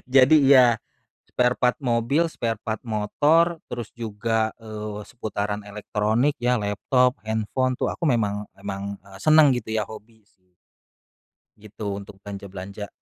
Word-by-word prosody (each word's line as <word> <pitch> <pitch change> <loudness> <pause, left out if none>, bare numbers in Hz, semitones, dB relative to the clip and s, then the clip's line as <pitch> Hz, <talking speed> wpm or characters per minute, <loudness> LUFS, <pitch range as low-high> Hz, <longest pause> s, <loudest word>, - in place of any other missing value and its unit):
Jadi, 135 +4 +7
iya 130 -4 +7 0.6
sparepart 125 0 +2
mobil, 125 +7 +1
sparepart 115 -5 -3
motor 150 +11 +2
terus 120 -3 -6
juga, 110 0 -1
eee, 105 -1 -6
seputaran 105 -3 -4
elektronik 105 +6 0
ya 125 +1 +2
laptop, 125 +4 +1
handphone 110 +4 0
tuh - - 0
aku - - -5
memang, 105 -5 0
emang, 100 0 -5
eee, 95 -1 -13
seneng 155 +2 +6
gitu 115 -3 -5
ya 110 - +1
hobi 110 +1 -12
sih. 90 -1 -38 1.0
Gitu 105 +1 -11
untuk 100 0 -7
belanja-belanja. 100 0 -7
110 Hz, 125 wpm, -24 LUFS, 105-125 Hz, 1.0 s, Jadi